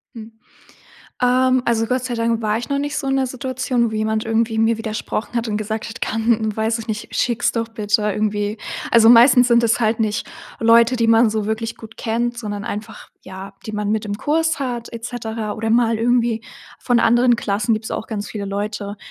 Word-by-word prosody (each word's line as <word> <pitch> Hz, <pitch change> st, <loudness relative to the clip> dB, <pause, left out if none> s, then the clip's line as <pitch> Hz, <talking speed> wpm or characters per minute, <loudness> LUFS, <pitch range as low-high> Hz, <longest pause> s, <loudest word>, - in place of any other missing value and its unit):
Hm, 225 Hz, 0 st, -9 dB, 0.9 s
ähm, 255 Hz, +1 st, +3 dB
also, 225 Hz, -1 st, +1 dB
Gott 255 Hz, +2 st, -1 dB
sei 245 Hz, -2 st, -3 dB
Dank 230 Hz, 0 st, 0 dB
war 215 Hz, 0 st, 0 dB
ich 235 Hz, -, -6 dB
noch 280 Hz, 0 st, 0 dB
nicht 290 Hz, +1 st, -3 dB
so 275 Hz, -, -3 dB
in 270 Hz, -, +1 dB
der 265 Hz, -1 st, +1 dB
Situation, 255 Hz, -2 st, -1 dB
wo -, -, -4 dB
jemand 215 Hz, 0 st, -1 dB
irgendwie 225 Hz, 0 st, 0 dB
mir 225 Hz, 0 st, +2 dB
widersprochen 220 Hz, +1 st, -4 dB
hat 235 Hz, 0 st, -1 dB
und 210 Hz, -1 st, -1 dB
gesagt 215 Hz, +1 st, -4 dB
hat: 230 Hz, -, -9 dB
„Kann 220 Hz, -1 st, 0 dB
weiß 225 Hz, +1 st, 0 dB
ich 225 Hz, -, -8 dB
nicht, 215 Hz, 0 st, -5 dB
schicks 240 Hz, -1 st, +1 dB
doch 230 Hz, -1 st, -2 dB
bitte 210 Hz, -2 st, 0 dB
irgendwie.“ 210 Hz, +1 st, -1 dB, 0.3 s
Also, 230 Hz, -1 st, +6 dB
meistens 245 Hz, +1 st, +7 dB
sind 235 Hz, -1 st, +4 dB
es 230 Hz, +1 st, +2 dB
halt 220 Hz, -1 st, +1 dB
nicht 215 Hz, -1 st, -1 dB, 0.3 s
Leute, 230 Hz, +2 st, +5 dB
die 230 Hz, -2 st, +1 dB
man 225 Hz, 0 st, +5 dB
so 215 Hz, -1 st, -2 dB
wirklich 220 Hz, +1 st, -3 dB
gut 220 Hz, -1 st, -12 dB
kennt, 235 Hz, +1 st, -2 dB
sondern 205 Hz, -3 st, -5 dB
einfach, 210 Hz, +1 st, -7 dB
ja, 190 Hz, +1 st, -9 dB
die 215 Hz, -, -5 dB
man 210 Hz, -1 st, -2 dB
mit 215 Hz, 0 st, -1 dB
im 205 Hz, -1 st, -3 dB
Kurs 320 Hz, +4 st, 0 dB
hat 245 Hz, -3 st, -4 dB
et 230 Hz, -1 st, -8 dB
cetera. 225 Hz, -3 st, -4 dB
Oder 225 Hz, 0 st, -3 dB
mal 230 Hz, 0 st, +3 dB
irgendwie 235 Hz, -1 st, +1 dB, 0.4 s
von 245 Hz, -2 st, +2 dB
anderen 240 Hz, +1 st, +4 dB
Klassen 210 Hz, 0 st, 0 dB
gibt's 220 Hz, 0 st, -4 dB
auch -, -, -4 dB
ganz 210 Hz, -2 st, -4 dB
viele 205 Hz, -2 st, -5 dB
Leute, 205 Hz, +1 st, -4 dB
225 Hz, 205 wpm, -20 LUFS, 215-240 Hz, 0.9 s, meistens